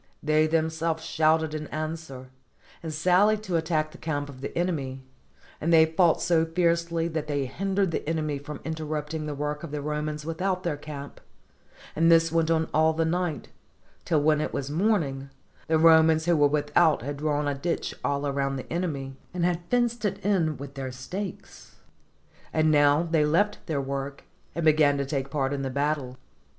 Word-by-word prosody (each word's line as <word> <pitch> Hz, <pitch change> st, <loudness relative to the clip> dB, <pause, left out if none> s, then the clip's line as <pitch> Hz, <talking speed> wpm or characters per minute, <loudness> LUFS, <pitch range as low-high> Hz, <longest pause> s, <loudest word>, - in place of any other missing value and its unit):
They 155 Hz, +1 st, +3 dB
them 160 Hz, 0 st, +1 dB
selves 160 Hz, 0 st, -2 dB
shouted 160 Hz, 0 st, +2 dB
in 155 Hz, -1 st, -4 dB
answer, 155 Hz, -4 st, -6 dB, 0.5 s
and 160 Hz, -, -5 dB
sallied 185 Hz, +7 st, +3 dB
to 185 Hz, -4 st, -2 dB
attack 160 Hz, -2 st, 0 dB
the -, -, -14 dB
camp 145 Hz, -3 st, -3 dB
of 130 Hz, -2 st, -11 dB
the 140 Hz, -, -5 dB
enemy; 140 Hz, -7 st, -2 dB, 0.6 s
and 165 Hz, -, 0 dB
they 160 Hz, -1 st, +7 dB
fought 165 Hz, +1 st, +2 dB
so 170 Hz, -2 st, +3 dB
fiercely 170 Hz, 0 st, 0 dB
that 155 Hz, -2 st, -3 dB
they 145 Hz, -2 st, -1 dB
hin 190 Hz, +9 st, -3 dB
dered 195 Hz, -3 st, +2 dB
the 155 Hz, -, -3 dB
enemy 155 Hz, -3 st, -1 dB
from 150 Hz, +2 st, -8 dB
interrupting 155 Hz, -1 st, -4 dB
the 150 Hz, -, -4 dB
work 150 Hz, +1 st, -3 dB
of 165 Hz, -, -7 dB
the 150 Hz, +1 st, -4 dB
Romans 150 Hz, +1 st, -3 dB
without 185 Hz, +3 st, -2 dB
their 170 Hz, -4 st, -1 dB
camp; 145 Hz, -1 st, -9 dB, 0.7 s
and 165 Hz, +2 st, +4 dB
this 165 Hz, -1 st, +5 dB
went 165 Hz, -1 st, +1 dB
on 160 Hz, -1 st, +2 dB
all 160 Hz, +1 st, +4 dB
the 165 Hz, +1 st, 0 dB
night, 175 Hz, -1 st, -2 dB, 0.5 s
till 155 Hz, -4 st, +1 dB
when 155 Hz, 0 st, +3 dB
it -, -, -2 dB
was 140 Hz, 0 st, -3 dB
morning, 150 Hz, -7 st, 0 dB, 0.4 s
the 160 Hz, -, +3 dB
Romans 160 Hz, 0 st, +5 dB
who 175 Hz, -1 st, +3 dB
were 145 Hz, -2 st, +5 dB
without 150 Hz, +1 st, +2 dB
had 140 Hz, +2 st, -4 dB
drawn 150 Hz, 0 st, 0 dB
a 145 Hz, -, +1 dB
ditch 165 Hz, +5 st, -2 dB
all 140 Hz, 0 st, 0 dB
round 135 Hz, 0 st, -1 dB
the 130 Hz, -, -7 dB
enemy, 140 Hz, -7 st, -3 dB, 0.2 s
and 175 Hz, -1 st, +1 dB
had 175 Hz, -1 st, 0 dB
fenced 240 Hz, -2 st, +1 dB
it 195 Hz, -7 st, 0 dB
with 140 Hz, 0 st, -8 dB
their 135 Hz, -2 st, -5 dB
stakes; 180 Hz, +10 st, -7 dB, 0.8 s
and 155 Hz, 0 st, +2 dB
now 145 Hz, +1 st, +4 dB
they 165 Hz, -2 st, +2 dB
left 200 Hz, +8 st, +1 dB
their 155 Hz, -4 st, -1 dB
work, 140 Hz, 0 st, -4 dB, 0.3 s
and 170 Hz, 0 st, -2 dB
began 150 Hz, -2 st, +4 dB
to 140 Hz, -, -1 dB
take 135 Hz, -1 st, -3 dB
part 140 Hz, -1 st, -1 dB
in 140 Hz, -, -2 dB
the 135 Hz, -, -2 dB
battle. 140 Hz, -2 st, -2 dB
155 Hz, 185 wpm, -26 LUFS, 145-165 Hz, 0.8 s, they